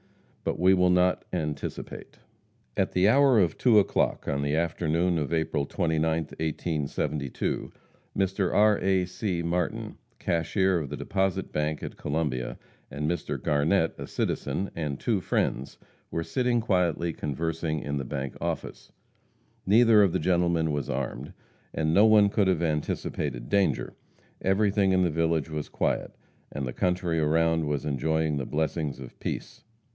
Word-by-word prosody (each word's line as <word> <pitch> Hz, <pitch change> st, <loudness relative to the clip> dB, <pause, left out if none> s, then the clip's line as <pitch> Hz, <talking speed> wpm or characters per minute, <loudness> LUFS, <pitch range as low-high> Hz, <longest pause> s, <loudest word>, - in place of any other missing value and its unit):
But -, -, -1 dB
we 95 Hz, +2 st, +5 dB
will 90 Hz, -1 st, +4 dB
not 90 Hz, 0 st, +3 dB
anticipate. 75 Hz, -5 st, -5 dB, 0.6 s
At -, -, 0 dB
the 90 Hz, +2 st, +4 dB
hour 135 Hz, 0 st, +5 dB
of 85 Hz, -5 st, +1 dB
two 120 Hz, -4 st, +5 dB
o'clock, 100 Hz, -, +1 dB
on 70 Hz, 0 st, 0 dB
the 70 Hz, +1 st, 0 dB
afternoon 85 Hz, +1 st, +1 dB
of 75 Hz, 0 st, -3 dB
April 80 Hz, -3 st, 0 dB
29th, 80 Hz, -2 st, 0 dB
1872, 75 Hz, -3 st, -2 dB, 0.5 s
Mr. 95 Hz, -1 st, +1 dB
R. 105 Hz, 0 st, +4 dB
A. 95 Hz, -1 st, +2 dB
C. 90 Hz, -2 st, -3 dB
Martin, 85 Hz, +1 st, -2 dB, 0.2 s
cashier 90 Hz, +2 st, +1 dB
of 75 Hz, -4 st, -5 dB
the 75 Hz, -, -5 dB
Deposit 95 Hz, -2 st, -1 dB
Bank 75 Hz, 0 st, -1 dB
at -, -, -6 dB
Columbia, 75 Hz, -5 st, -2 dB, 0.3 s
and 75 Hz, +1 st, -2 dB
Mr. 85 Hz, -, -3 dB
Garnett, 80 Hz, +4 st, +2 dB
a -, -, -6 dB
citizen, 100 Hz, -, -2 dB
and 75 Hz, -4 st, -3 dB
two 110 Hz, -5 st, 0 dB
friends, 70 Hz, -5 st, -1 dB, 0.3 s
were 85 Hz, -, -2 dB
sitting 125 Hz, +3 st, +1 dB
quietly 90 Hz, -6 st, +1 dB
conversing 80 Hz, +2 st, -2 dB
in 70 Hz, 0 st, -3 dB
the 70 Hz, -, -2 dB
bank 65 Hz, 0 st, -4 dB
office. -, -, -4 dB, 0.8 s
Neither 110 Hz, +1 st, +6 dB
of 100 Hz, -3 st, +4 dB
the 95 Hz, -, 0 dB
gentlemen 85 Hz, -3 st, +1 dB
was 70 Hz, -3 st, -2 dB
armed, 65 Hz, -1 st, -3 dB, 0.4 s
and 80 Hz, 0 st, +1 dB
no 105 Hz, +5 st, +6 dB
one 105 Hz, -2 st, +6 dB
could 100 Hz, -1 st, +2 dB
have 90 Hz, -3 st, +1 dB
anticipated 75 Hz, -5 st, -2 dB
danger. 100 Hz, -1 st, +1 dB, 0.5 s
Everything 100 Hz, 0 st, +2 dB
in 95 Hz, 0 st, +3 dB
the 85 Hz, -, +1 dB
village 80 Hz, -1 st, 0 dB
was 75 Hz, -1 st, -4 dB
quiet, -, -, -1 dB, 0.4 s
and 70 Hz, -, -3 dB
the 65 Hz, -, -4 dB
country 90 Hz, -2 st, 0 dB
around 80 Hz, +1 st, +2 dB
was 75 Hz, -2 st, -2 dB
enjoying 75 Hz, +2 st, 0 dB
the 65 Hz, -, -3 dB
blessings 75 Hz, -2 st, -2 dB
of 65 Hz, -2 st, -10 dB
peace. -, -, -5 dB
80 Hz, 150 wpm, -27 LUFS, 75-95 Hz, 0.8 s, Neither